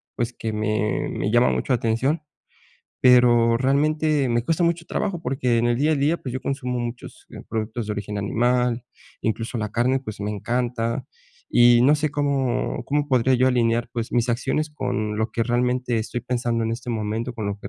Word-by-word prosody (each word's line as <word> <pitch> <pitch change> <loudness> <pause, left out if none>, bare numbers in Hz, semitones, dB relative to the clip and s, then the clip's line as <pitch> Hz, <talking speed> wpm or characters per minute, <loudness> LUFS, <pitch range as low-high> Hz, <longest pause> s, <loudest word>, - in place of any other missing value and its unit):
pues, 120 0 -2
que 110 - -4
me 105 -1 -1
me 100 - -2
llama 120 +1 +4
mucho 130 - 0
la - - +5
atención, 125 +8 0 0.8
pero 120 -2 +5
realmente 145 +2 +1
me 120 0 0
cuesta 165 +3 0
mucho 170 -1 0
trabajo 195 -5 -2
porque 125 -3 0
en 120 - +2
el 120 0 +2
día 150 +4 +2
a - - +3
día, 145 +4 +1
pues, 130 - -6
yo 130 - -3
consumo 125 -2 -3
muchos, 120 0 -6
eh, - - -9
productos 110 0 -3
de 105 - -2
origen 105 0 -4
animal. 120 +3 +1 0.4
Incluso 115 +2 -2
la 105 -1 -3
carne, 130 +3 +2
pues, 110 -5 -8
me 105 +1 -2
encanta, 120 +3 -2 0.4
y 120 0 +6
no 145 +4 +5
sé 150 -1 -1
cómo 140 -4 -1
cómo 145 +1 -1
podría 130 0 +3
yo 130 +1 +3
alinear, 120 -1 +1
pues, 115 -1 -4
mis 120 0 +1
acciones 150 +6 0
con 110 -7 -2
lo 110 +1 -1
que 115 - 0
realmente 125 0 0
estoy 120 +2 -3
pensando 120 -1 -1
en 115 - -1
este 120 +1 -5
momento, 110 +2 -2
con 110 -3 -4
lo 100 0 -3
que 100 - -8
120 Hz, 195 wpm, -23 LUFS, 115-130 Hz, 0.8 s, y